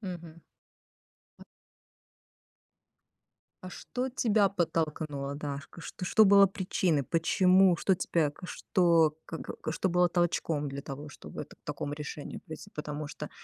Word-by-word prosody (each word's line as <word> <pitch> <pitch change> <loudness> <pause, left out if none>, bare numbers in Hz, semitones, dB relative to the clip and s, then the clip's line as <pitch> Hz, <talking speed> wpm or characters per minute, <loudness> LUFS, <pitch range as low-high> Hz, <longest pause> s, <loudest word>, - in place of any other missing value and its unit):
Мгм. 170 -4 -8 1.0
М. - - -13 2.2
А - - -7
что 255 +7 -4
тебя 215 -5 +2
подтолкнуло, 155 -6 -2
Дашка? 145 +2 -6
Что 180 - -7
что 215 +4 +5
было 200 0 +8
причиной? 185 -5 0
Почему? 185 +4 +4
Что 190 - +3
тебя 165 -4 0
что, 170 -4 +2
как 160 - -6 0.3
что 190 - 0
было 180 0 +4
толчком 165 -4 0
для 140 +1 -6
того, 140 +3 -7
чтобы - - -8
к - - -28
так - - -17
такому 145 - -4
решению 150 0 -7
прийти. 155 +6 -9
Потому 150 0 -4
что, - - -7
165 Hz, 130 wpm, -30 LUFS, 150-185 Hz, 2.2 s, было